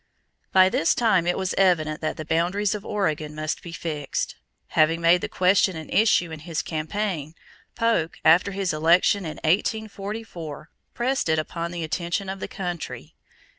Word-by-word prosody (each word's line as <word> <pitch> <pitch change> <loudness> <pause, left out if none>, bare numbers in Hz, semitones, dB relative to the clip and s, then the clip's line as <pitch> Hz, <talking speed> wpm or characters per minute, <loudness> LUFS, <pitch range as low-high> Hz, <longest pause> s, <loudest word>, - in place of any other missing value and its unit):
_ - - -48
By 185 0 +6
this 165 -3 +2
time 195 -8 +2
it 175 - +1
was 190 -1 -1
evident 155 -5 +2
that 155 - -2
the 155 - -6
boundaries 180 +6 +1
of 210 -2 -5
Oregon 155 -7 -2
must 155 0 -3
be 170 - -9
fixed. 155 -5 -3 0.4
Having 160 +1 +3
made 170 +1 +4
the - - -3
question 185 0 +3
an 160 -1 -8
issue 190 -6 +3
in 160 - -7
his 165 0 -3
campaign, 160 -1 -3 0.4
Polk, 230 -9 +1
after 165 +5 +6
his 195 -3 -1
election 170 +5 +3
in 155 - -5
1844, 200 -3 -2 0.2
pressed 255 -5 0
it 160 - +3
upon 170 +2 -3
the 170 -1 -5
attention 170 +4 -2
of 190 0 -5
the - - -4
country. 175 -4 -6
175 Hz, 170 wpm, -24 LUFS, 160-195 Hz, 0.4 s, By